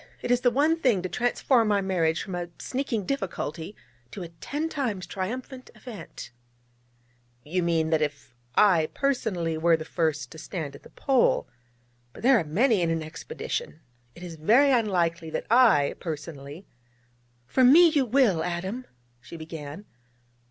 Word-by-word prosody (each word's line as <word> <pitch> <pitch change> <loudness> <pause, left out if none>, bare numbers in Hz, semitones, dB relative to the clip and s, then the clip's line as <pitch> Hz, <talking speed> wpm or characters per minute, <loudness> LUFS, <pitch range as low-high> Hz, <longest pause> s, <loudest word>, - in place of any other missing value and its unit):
It - - -1
is 245 0 +3
the 245 - +4
one 300 +7 +2
thing 230 - +2
to 185 - -3
transform 240 -1 +1
our 200 -1 +2
marriage 170 -4 0
from 190 - -7
a 175 -1 -4
sneaking 250 -6 -3
difficulty 180 - -4 0.3
to 185 - -7
a 170 - -8
ten 290 - -4
times 235 - -3
triumphant 250 +8 -6
event.' 220 - -10 1.1
'You 180 +5 -1
mean 165 -2 +1
if 145 -5 -2 0.2
I 175 -7 +4
personally 185 - -1
were 165 0 +4
the 155 - -7
first 155 -6 -1
to 160 - -10
stand 155 -5 -6
at 140 - -13
the - - -16
Pole. 265 -3 +1 0.7
But - - -13
there 255 -1 +6
are - - -1
many 205 - +2
in 170 - +1
an 165 -1 -1
expedition. 170 - -6 0.3
It 175 - -11
is 170 -2 -8
very 240 - +4
unlikely 175 -9 +1
that - - -4
I, 225 - +5
personally 155 0 -7 0.4
' 120 0 -39
'For 255 - +1
me 325 +7 +8
you 285 -5 +1
will, 220 -10 +3
Adam 190 +9 -4 0.2
' 120 0 -39
she 165 - -10
began. 160 +2 -8
180 Hz, 160 wpm, -26 LUFS, 160-245 Hz, 1.1 s, me